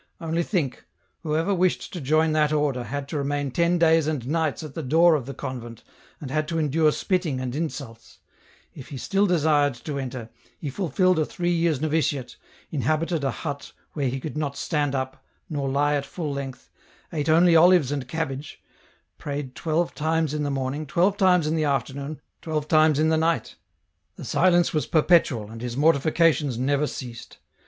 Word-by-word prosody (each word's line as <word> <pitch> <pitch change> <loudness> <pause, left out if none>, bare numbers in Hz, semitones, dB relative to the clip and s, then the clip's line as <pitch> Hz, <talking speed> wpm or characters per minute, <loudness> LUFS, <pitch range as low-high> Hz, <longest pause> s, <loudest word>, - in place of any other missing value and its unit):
Only 165 0 -1
think; 165 - -2 0.3
whoever 160 +4 0
wished 185 -1 0
to 175 - -5
join 155 +3 +2
that 155 -1 +2
order 145 -5 0
had 140 +4 -4
to 150 - -2
remain 140 0 -2
ten 170 +4 +2
days 165 -2 +4
and 150 -6 -2
nights 160 0 -1
at 150 -3 -8
the 165 - -4
door 165 +5 +4
of 140 -5 -1
the 140 - -5
convent, 120 -3 -7 0.4
and 135 -3 -7
had 155 +1 0
to 165 +1 -2
endure 155 0 +2
spitting 170 -6 -1
and 130 -1 -4
insults; 140 -7 -6 0.6
if 135 - -10
he 140 - -6
still 195 +9 +1
desired 150 -5 +2
to 140 +4 -5
enter, 125 -4 -6 0.3
he 145 - -5
fulfilled 185 +1 +1
a - - +3
three 175 +2 -2
years' 165 -4 +1
novitiate, 150 -4 -1 0.4
inhabited 155 +3 0
a 135 - +1
hut 140 0 -6 0.2
where 140 -4 -1
he 135 +2 -3
could 150 +3 -6
not 145 -2 -3
stand 145 -4 -1
up, 130 0 -4 0.3
nor 140 -3 -2
lie 145 +2 +2
at 145 -1 0
full 150 -2 -4
length, 135 -2 -7 0.4
ate 155 -1 -1
only 170 +2 +5
olives 170 -4 +5
and 140 -3 -3
cabbage, 145 -2 -4 0.6
prayed 140 -2 -5
twelve 165 +3 -1
times 160 -1 0
in 150 - -2
the 145 - -1
morning, 140 +2 -3
twelve 185 +7 +2
times 185 -5 +3
in 155 +1 0
the 160 - +1
afternoon, 140 +2 -2 0.2
twelve 155 -2 -3
times 155 -2 +4
in 155 +1 +3
the 160 - +3
night; 165 +1 0 0.6
the - - -9
silence 175 -1 +3
was 155 - 0
perpetual, 150 - +3
and 115 0 -9
his 120 0 -4
mortifications 150 -2 +3
never 140 +4 +1
ceased. 120 -2 -8
150 Hz, 180 wpm, -24 LUFS, 135-165 Hz, 0.6 s, only